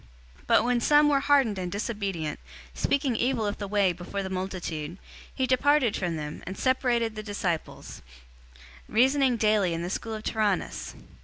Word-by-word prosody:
019:009 - - -24
But - - +5
when 245 0 +2
some 295 +2 +5
were 280 -1 +3
hardened 275 -8 +3
and 180 -1 -4
disobedient, 200 -7 -3 0.3
speaking 275 - 0
evil 240 -1 0
of 205 0 -3
the 200 - -4
Way 200 -2 +2
before 180 +3 -5
the 190 - -5
multitude, 180 -4 -4 0.3
he 260 - -1
departed 260 -1 +3
from 175 -3 -2
them, 150 -1 -6
and 185 - -5
separated 245 -3 +1
the 215 - -4
disciples, 200 -6 -4 0.9
reasoning 260 +2 +3
daily 210 -5 +2
in 165 - -3
the 175 - -4
school 225 +1 -4
of 215 - -7
Tyrannus. 215 -5 -1
215 Hz, 165 wpm, -27 LUFS, 185-250 Hz, 0.9 s, But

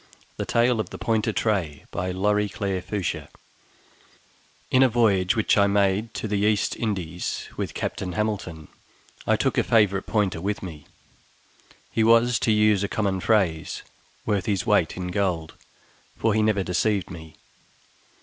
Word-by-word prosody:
THE - - -3
TALE 120 0 +2
OF 100 -5 -2
THE - - -8
POINTER 110 0 0
TRAY 95 -10 -1 2.9
In 130 - +5
a 130 - +6
voyage 100 -5 +2
which 110 -1 +2
I 100 - +5
made 100 +2 +1
to - - -3
the 105 -1 -1
East 105 0 +1
Indies 90 -6 -3
with - - -4
Captain 90 -2 -3
Hamilton, 95 -7 -3 0.6
I - - +4
took - - +1
a - - +3
favorite 100 -4 +2
pointer 100 -6 0
with 100 +2 -2
me; 80 -5 -9 1.0
he 115 - +1
was, 115 +1 +4
to 110 - +1
use 105 -2 +3
a - - 0
common 100 -2 -1
phrase, 90 -6 0 0.4
worth 100 -4 0
his 100 0 0
weight 105 -9 +2
in 90 -1 -4
gold, 90 -4 -1 0.6
for 110 -1 +1
he 110 - +2
never 105 -2 +2
deceived 95 +2 0
me. 80 -3 -10
100 Hz, 140 wpm, -24 LUFS, 90-110 Hz, 2.9 s, a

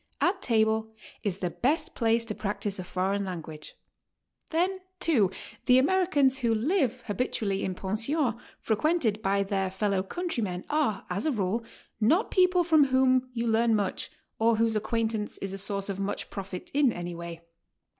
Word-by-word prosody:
At 380 +2 +1
table 220 -1 +2 0.3
is 195 -3 -2
the 180 -3 -2
best 290 - 0
place 230 0 +2
to 220 - -2
practice 205 -1 -3
a - - -3
foreign 195 +3 -1
language. 160 -5 -7 0.7
Then, 365 +4 +1 0.2
too, 260 - +3 0.4
the 250 - +7
Americans 285 -3 +3
who 235 -3 +2
live 255 - 0
habitually 205 -2 -1
in 185 - -2
pensions 230 - 0 0.3
fre 220 - 0
quented 240 -5 +1
by 200 0 +2
their 195 -1 -1
fellow 195 0 0
countrymen 210 - -3
are, 295 -9 0
as 200 - -1
a - - +2
rule, 215 0 -1 0.4
noit 315 - +3
people 365 -1 +4
from 315 -4 +5
whom 260 -1 +3
you 230 0 -1
learn 225 0 +3
much 200 -3 -2 0.3
or 225 +1 +4
whose 225 0 +1
acquaintance 220 0 -1
is 195 -1 -5
a 195 - -4
source 200 0 -1
of 200 -1 -4
much 200 +1 -3
profit 195 -2 -6
in 280 -3 +4
any 175 -3 -5
way. 170 -1 -7
220 Hz, 165 wpm, -28 LUFS, 195-265 Hz, 0.7 s, the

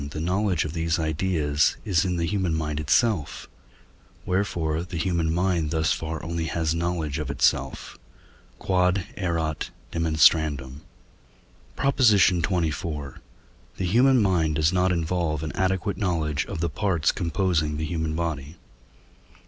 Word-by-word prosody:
the 75 - -6
knowledge 90 +1 0
of 75 - -5
these 85 +1 0
ideas 80 -2 0
is 90 -6 +2
in 90 -2 -1
the 85 - 0
human 95 -2 0
mind 75 -1 -2
itself; 80 - 0 0.8
wherefore 85 -4 -1
the 90 0 -6
human 85 -1 0
mind 85 -2 0
thus 80 0 +1
far 80 -1 -5
only 85 -1 -3
has 80 -1 -1
knowledge 85 -3 -2
of 75 -3 -4
itself. 70 - 0 0.7
Q.E.D. 90 0 +2 0.2
PROP. 85 -4 -1 0.3
XXIV. 75 -4 +2 3.0
The 95 - -2
human 125 +8 +4
mind 85 -6 +1
does 80 +3 +2
not 90 0 +2
involve 85 -2 -1
an 80 - -3
adequate 95 +1 -1
knowledge 80 -7 -1
of 80 - -5
the 85 - 0
parts 90 -7 +1
composing 85 -4 0
the 80 - -2
human 80 -1 -2
body. 80 -3 -3
85 Hz, 125 wpm, -25 LUFS, 80-90 Hz, 3.0 s, human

